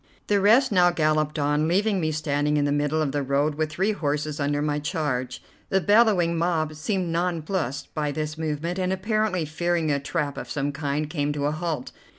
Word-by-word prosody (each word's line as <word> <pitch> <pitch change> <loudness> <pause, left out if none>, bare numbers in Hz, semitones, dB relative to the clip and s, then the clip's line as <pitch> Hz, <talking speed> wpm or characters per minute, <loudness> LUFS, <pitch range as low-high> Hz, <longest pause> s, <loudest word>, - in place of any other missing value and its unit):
The 205 -1 +2
rest 235 +6 +5
now 180 -3 +5
galloped 155 -2 +1
on, 150 +1 +1
leaving 195 +2 +1
me 155 -1 0
standing 150 -1 0
in 145 - +2
the 145 - +1
middle 145 +2 +1
of 140 - -1
the 145 +1 -1
road, 140 +3 +1
with 155 +1 -1
three 190 +7 +1
horses 150 -5 -2
under 145 0 0
my 150 0 0
charge. 145 -6 -3 0.3
The 190 - +3
bellowing 190 -4 +3
mob 165 -3 0
seemed 180 +3 -2
nonplussed 165 -4 -2
by 150 -2 -1
this 155 0 -3
movement, 160 +3 -3
and, 185 0 0
apparently 205 -2 0
fearing 165 +1 0
a 140 - +1
trap 145 -1 -3
of - - -8
some 145 0 -1
kind, 145 +1 -2
came 150 -2 -1
to 145 -1 -2
a 145 - +1
halt. 155 -4 -3
155 Hz, 195 wpm, -25 LUFS, 145-175 Hz, 0.3 s, rest